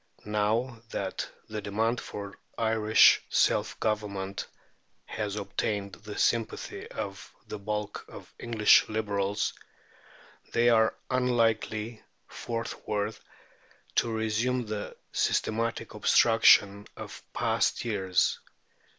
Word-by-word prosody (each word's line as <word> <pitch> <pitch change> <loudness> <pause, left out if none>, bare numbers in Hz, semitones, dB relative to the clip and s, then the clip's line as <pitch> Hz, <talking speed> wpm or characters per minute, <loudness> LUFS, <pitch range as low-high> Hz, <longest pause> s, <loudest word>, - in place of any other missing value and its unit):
Now 110 +3 0
that 95 -4 -3 0.2
the 110 -1 -5
demand 110 +4 0
for 100 -1 -7 0.2
Irish 110 -1 +5
self - - +2
government 100 -3 -2 0.6
has 105 -2 -4
obtained 100 -1 -2
the 105 -1 -9
sympathy 115 -2 -1
of - - -6
the 105 - -7
bulk 105 0 -4
of - - -12
English 115 -3 +4
Liberals, 105 -2 -1 1.0
they 120 +1 +4
are 110 -1 +4 0.2
unlikely 115 -3 +1 0.3
forthwith 110 -2 -4 0.7
to 115 - +2
resume 110 +3 0
the 105 -1 -5
systematic 115 +1 0
obstruction 105 -3 +5
of - - -8
past - - 0
years. 95 -5 +1
110 Hz, 95 wpm, -28 LUFS, 105-115 Hz, 1.0 s, Irish